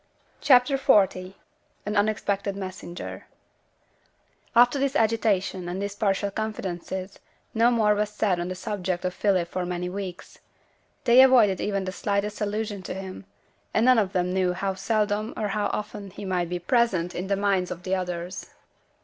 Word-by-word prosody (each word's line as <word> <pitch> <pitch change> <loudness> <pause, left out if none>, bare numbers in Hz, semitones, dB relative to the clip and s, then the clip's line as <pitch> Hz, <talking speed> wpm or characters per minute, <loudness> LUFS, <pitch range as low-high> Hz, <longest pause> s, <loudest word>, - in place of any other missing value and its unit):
CHAPTER 255 +1 +5
XL 265 -6 +6 0.8
AN 210 +1 -2
UNEXPECTED 205 -1 0
MESSENGER 185 -2 -7 1.3
After 245 +3 +5
this 275 +1 0
agitation, 205 -6 +1
and 180 +2 -4
these 200 0 -3
partial 200 -1 0
confidences, 190 -3 -5 0.3
no 230 +1 +4
more 220 -3 +3
was 210 0 0
said 210 -4 0
on 175 - -2
the 185 - -4
subject 185 -2 -3
of 180 - -1
Philip 185 -4 +1
for 185 +1 -3
many 180 0 -3
weeks. 185 -2 -7 0.6
They 240 +2 +7
avoided 235 -8 +5
even 200 -2 -1
the 185 - -3
slightest 205 +2 -2
allusion 210 -1 -2
to 185 - -6
him; 190 0 -7 0.5
and 220 - +3
none 255 -2 +6
of 195 -3 0
them 180 -1 0
knew 185 -1 +1
how 195 +2 -2
seldom 210 +2 -1
or 210 -2 -1
how 205 +1 0
often 205 -1 -5
he 200 +2 -9
might 180 -2 -1
be 180 - -2
present 180 -3 +1
in 180 +2 -4
the 200 0 0
minds 195 -2 +1
of 175 - -7
the 185 - -2
others. 180 0 -4
200 Hz, 165 wpm, -25 LUFS, 185-215 Hz, 1.3 s, They